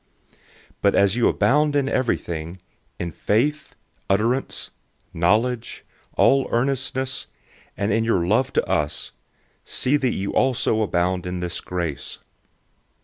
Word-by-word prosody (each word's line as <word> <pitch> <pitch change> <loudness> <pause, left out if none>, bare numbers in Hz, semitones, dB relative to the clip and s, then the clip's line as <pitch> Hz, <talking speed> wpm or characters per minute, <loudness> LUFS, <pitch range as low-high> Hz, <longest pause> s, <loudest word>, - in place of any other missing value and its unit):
008:007 - - -30 0.4
But 100 - +3
as 100 +1 +4
you 120 - +3
abound 150 +2 +2
in 140 -2 +2
everything, 85 - -2 0.4
in 85 -1 -4
faith, 140 - 0 0.3
utterance, 115 +7 0 0.4
knowledge, 110 +8 0 0.3
all 135 0 +4
earnestness, 130 +1 -1 0.5
and 100 0 0
in 110 +1 +2
your 95 -7 +1
love 125 +8 +2
to - - +1
us, 75 0 -1 0.5
see 140 +3 +1
that 130 -4 0
you 100 +1 -3
also 125 -4 +2
abound 90 -2 0
in 90 0 -3
this 90 -1 -3
grace. 85 -5 -4
110 Hz, 125 wpm, -23 LUFS, 90-130 Hz, 0.5 s, as